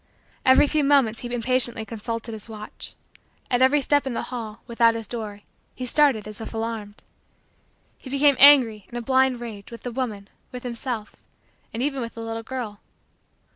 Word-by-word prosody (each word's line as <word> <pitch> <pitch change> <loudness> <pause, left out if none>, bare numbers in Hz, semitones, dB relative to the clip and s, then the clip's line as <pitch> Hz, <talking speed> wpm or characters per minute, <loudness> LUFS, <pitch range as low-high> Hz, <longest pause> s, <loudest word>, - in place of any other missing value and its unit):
Every 260 +2 +6
few 300 +1 +1
moments 275 -6 +3
he 240 - -6
impatiently 240 -1 0
consulted 230 +1 -5
his 220 0 -7
watch. 215 -1 -9 0.6
At 245 0 +2
every 270 +3 +5
step 285 0 +3
in 250 - -3
the - - -2
hall, 225 -3 -6
without 230 -1 +3
his 225 -1 -4
door, 210 -3 -6 0.3
he 255 - -5
started 255 -5 +3
as 215 +1 -9
if 225 - -7
alarmed. 225 -2 -5 1.0
He 265 - -11
became 280 +1 +4
angry, 250 -8 +7
in 240 - -6
a - - -3
blind 260 0 +2
rage, 220 -4 -8
with 230 -2 -11
the 245 - -4
woman, 225 -5 -4 0.2
with 250 -1 -7
himself 235 -2 -5 0.5
and 230 +3 -3
even 275 -2 -1
with 230 -1 -6
the 230 - -7
little 225 0 -4
girl. 225 -4 -6
235 Hz, 175 wpm, -24 LUFS, 220-260 Hz, 1.0 s, angry